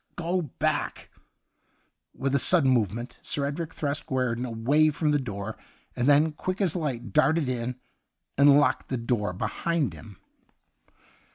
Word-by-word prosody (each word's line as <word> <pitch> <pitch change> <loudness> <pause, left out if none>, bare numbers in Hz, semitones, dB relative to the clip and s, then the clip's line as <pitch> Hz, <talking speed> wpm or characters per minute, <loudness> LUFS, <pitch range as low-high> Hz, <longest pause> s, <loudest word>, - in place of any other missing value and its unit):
' - - -39
Go 175 +2 -1
back 150 -7 -3 0.5
!' - - -45
With 135 0 -1
a 140 - +3
sudden 135 0 +4
movement, 120 +1 -1
Sir 140 - -1
Edric 155 +3 -4
thrust 145 0 -3
Guerdon 125 -2 -1
away 135 +7 +2
from 150 0 0
the 145 - +2
door, 105 -4 -5 0.4
and 125 +3 +1
then, 150 +2 +5
quick 185 +5 -4
as 190 -5 +1
light, 125 - -3
darted 155 +1 +3
in, 125 0 -2 0.6
and 140 +1 +6
locked 145 - +1
the 130 - -1
door 115 -4 -1
be 90 - -4
hind 170 -5 -1
him. 105 -4 -12
140 Hz, 160 wpm, -26 LUFS, 120-155 Hz, 0.6 s, and